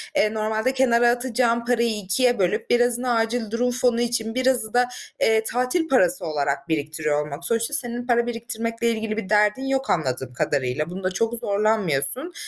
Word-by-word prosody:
eee, 215 +1 +2
normalde 220 +3 -1
kenara 240 -2 +3
atacağın 240 -1 0
parayı 235 -2 +1
2'ye 225 +5 +1
bölüp 180 -2 0
birazını 245 +1 +2
acil 225 -1 -1
durum 245 +2 0
fonu 245 -1 +1
için, 235 -1 -1
birazı 255 -4 +1
da, 245 0 +4 0.4
eee, 220 0 +3
tatil 250 +9 0
parası 180 - +2
olarak 145 -1 -2
biriktiriyor 150 -1 -1
olmak. 150 +3 -6
Sonuçta 230 +4 0
senin 245 -4 -1
para 235 -1 +2
biriktirmekle 230 0 -2
ilgili 220 -1 -2
bir 195 -4 -4
derdin 210 +4 +2
yok 270 0 -1
anladığım 130 -5 -1
kadarıyla. 140 +2 -1
Bunda 185 +1 -3
çok 225 +5 -1
zorlanmıyorsun. 215 - 0
230 Hz, 160 wpm, -23 LUFS, 190-245 Hz, 0.4 s, da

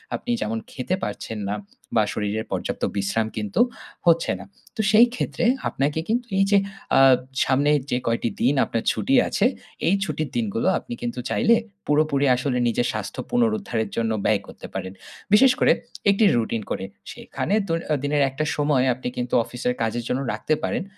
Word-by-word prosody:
আপনি 245 - -4
যেমন 115 +1 -1
খেতে 135 +8 -2
পারছেন 110 - -4
না। 105 - -1 0.4
বা 110 - +5
শরীরের 105 +1 -2
পর্যাপ্ত - - -3
বিশ্রাম 100 +3 0
কিন্তু 105 -2 0 0.5
হচ্ছে 170 0 +4
না। 100 - -9 0.3
তো 225 - 0
সেই 225 +3 +7
ক্ষেত্রে 245 - -2 0.2
আপনাকে 145 +3 -1
কিন্তু 240 +2 0
এই 195 - +5
যে 200 - +6 0.4
আ - - +7 0.5
সামনে 140 +3 +2 0.2
যে 125 - +2
কয়টি 115 0 +1
দিন 130 +4 +3
আপনার 115 - -2
ছুটি 270 - 0
আছে। 205 - +1 0.4
এই 190 - +4
ছুটির 155 -4 -3
দিনগুলো 115 -1 -1
আপনি - - -8
কিন্তু 120 +1 -3
চাইলে 235 0 +4 0.3
পুরোপুরি 150 -1 +2
আসলে 130 0 -1
নিজের 120 +1 +1
স্বাস্থ্য - - -5
পুনরুদ্ধারের 215 - 0
জন্য 115 -1 0
ব্যয় - - +3
করতে - - -10
পারেন। 95 0 -5 0.4
বিশেষ 260 +5 +7
করে - - +5 0.4
একটি 200 +2 +3
রুটিন 115 -1 0
করে। 95 - -2 0.3
সেখানে - - -4
দৈ 165 -1 +1 0.2
এ - - +3
দিনের 145 0 +1
একটা 135 +4 -3
সময় 145 -3 +2
আপনি 125 +1 -6
কিন্তু 125 0 -3
অফিসের 125 +1 -2
কাজের 115 +1 -1
জন্য 130 - 0
রাখতে 110 +8 -1
পারেন। - - -1
130 Hz, 170 wpm, -23 LUFS, 115-170 Hz, 0.5 s, সেই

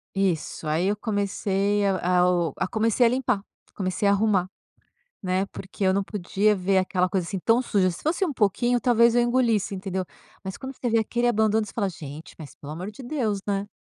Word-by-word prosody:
Isso, 180 -4 -1
aí 165 +5 +1
eu 205 +1 0
comecei 205 -1 0
a 180 -2 +1
a 180 0 +4
o 175 -2 0
a - - -1
comecei 225 +2 +2
a - - +5
limpar, 250 -4 0 0.3
comecei 185 +1 -2
a - - +5
arrumar, 200 -3 +2 0.7
né, 185 0 0
porque 195 +1 -9
eu 190 -1 +4
não 195 0 0
podia 205 +1 +1
ver 190 0 +1
aquela 185 -1 +1
coisa 185 -2 -1
assim 190 +1 -4
tão 230 +6 +3
suja, 200 -7 +1
se 170 - -8
fosse 335 +5 0
um 325 - -2
pouquinho 240 +2 +1
talvez 235 -1 +4
eu - - +5
engolisse, 235 -5 +1
entendeu, 190 -1 -3 0.4
mas 190 0 -5
quando 265 0 -7
você 245 - -4
vê 230 -1 +3
aquele 240 +2 -1
abandono 220 -2 +2
você - - -10
fala: 205 -4 0
"Gente, 155 -3 -9
mas 155 -4 -10
pelo 145 +1 -9
amor 185 +6 -6
de 265 - -11
Deus, 240 -7 -1
né!". 200 0 -1
200 Hz, 210 wpm, -25 LUFS, 185-230 Hz, 0.7 s, a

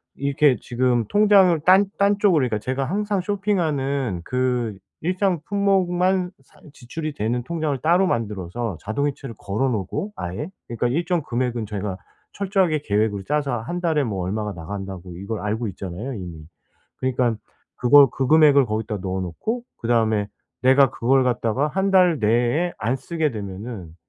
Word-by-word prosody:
이렇게 140 -1 +2
지금 120 -1 0
통장을 200 - +5
딴 190 +2 +6
딴 200 0 +3
쪽으로, 190 -7 +4
그러니까 110 -3 -2
제가 130 +5 -2
항상 205 +5 -1
쇼핑하는 150 - -1
그 125 -4 -1 0.2
일정 185 0 0
품목만 185 -2 +1
사 - - -24
지출이 155 +4 -6
되는 120 +1 -2
통장을 155 -2 -2
따로 175 +4 +3
만들어서 105 - -3
자동이체를 135 +2 -3
걸어 105 +7 -1
놓고 120 - -3
아예 90 - -5 0.2
그러니까 120 +1 -1
일정 170 +5 0
금액은 120 -2 -2
저희가 100 -2 -4 0.4
철저하게 190 -6 +1
계획을 105 -2 0
짜서 140 -5 -1
1 175 +10 -4
달에 160 -4 +1
뭐 100 -7 -3
얼마가 105 +2 -3
나간다고 95 0 -7
이걸 100 +4 -5
알고 110 +2 -2
있잖아요, 95 +7 -6
이미. 85 -5 -8 0.5
그러니까 125 -2 0 0.4
그걸 140 +3 +7
그 130 - -2
금액을 150 -3 +6
거기다 110 -1 -3
넣어 95 0 -3
놓고 215 - -4
그다음에 110 -3 +1 0.3
내가 130 +1 +5
그걸 130 +2 +2
갖다가 125 +2 0
1 190 +5 0
달 180 -5 +4
내에 120 +10 +2
안 115 +5 0
쓰게 155 +2 -2
되면은 100 -4 -7
130 Hz, 335 characters per minute, -22 LUFS, 110-165 Hz, 0.5 s, 그걸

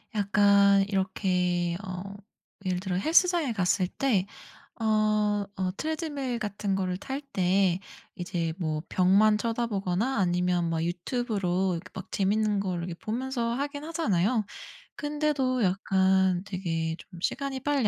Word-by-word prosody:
약간 200 -1 +5
이렇게 180 -3 0
어 185 +1 -6 0.5
예를 180 -1 0
들어 185 -1 -3
헬스장에 330 - +3
갔을 185 -2 +1
때 205 -3 +1 0.6
어 215 -2 +2
어 185 -1 -1
트레드밀 290 -6 -3
같은 205 -2 -2
걸 185 -1 -1
탈 270 +7 -4
때 185 -1 +2 0.4
이제 175 -2 -2
뭐 155 -3 -2
벽만 200 +4 +4
쳐다보거나 225 0 -1
아니면 180 -2 +1
막 165 -1 -1
유튜브로 190 0 -1
이렇게 165 - -9
막 - - -8
재미있는 210 +1 +1
걸 185 -3 -2
이렇게 170 0 -4
보면서 235 +3 -2
하긴 285 +3 -3
하잖아요. 220 - +1 0.5
근데도 295 -4 0
약간 190 -1 +2
되게 165 -4 -2
좀 180 -2 -12
시간이 270 +8 -2
빨리 280 -4 +1
200 Hz, 270 characters per minute, -28 LUFS, 180-235 Hz, 0.6 s, 약간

